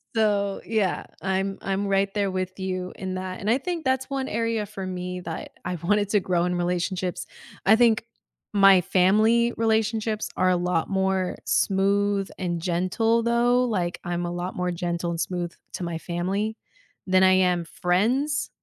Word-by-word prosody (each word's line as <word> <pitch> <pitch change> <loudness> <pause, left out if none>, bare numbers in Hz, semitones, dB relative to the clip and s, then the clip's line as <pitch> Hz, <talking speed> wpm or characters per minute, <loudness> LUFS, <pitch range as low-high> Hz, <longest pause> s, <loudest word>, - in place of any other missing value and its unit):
So, 205 -2 +1
yeah, 215 -5 0
I'm 190 +1 -1
I'm 195 +1 -1
right 195 0 +1
there 200 -2 0
with 185 0 -3
you 185 -1 -3
in 190 -2 -4
that, 185 +1 -5
and 210 - -1
I 240 - +4
think 340 +2 -4
that's 260 0 0
1 270 -1 -2
area 230 -1 -1
for 195 -2 -7
me 180 0 -4
that 165 -2 -6
I 180 - -2
wanted 205 +4 +1
to 205 - +4
grow 175 -1 +1
in 180 0 0
relationships. 180 +1 -2 0.4
I 215 +3 +7
think 230 -2 +3 0.5
my 195 -2 +7
family 215 +6 +3
relationships 220 -1 0
are 185 - +3
a 180 - +3
lot 175 -1 0
more 190 -1 0
smooth 200 0 +1
and 175 -3 -2
gentle 185 +7 +1
though, 240 +1 +3
like, 185 -7 -1
I'm 175 0 -2
a 175 - -3
lot 175 +1 -4
more 180 0 -1
gentle 175 0 -2
and 170 - -3
smooth 175 0 -2 0.2
to 180 - -4
my 170 -1 -3
family 190 +6 -2 0.5
than 185 0 +4
I 185 0 +6
am 180 -2 +2
friends 240 - 0
190 Hz, 170 wpm, -25 LUFS, 180-215 Hz, 0.5 s, I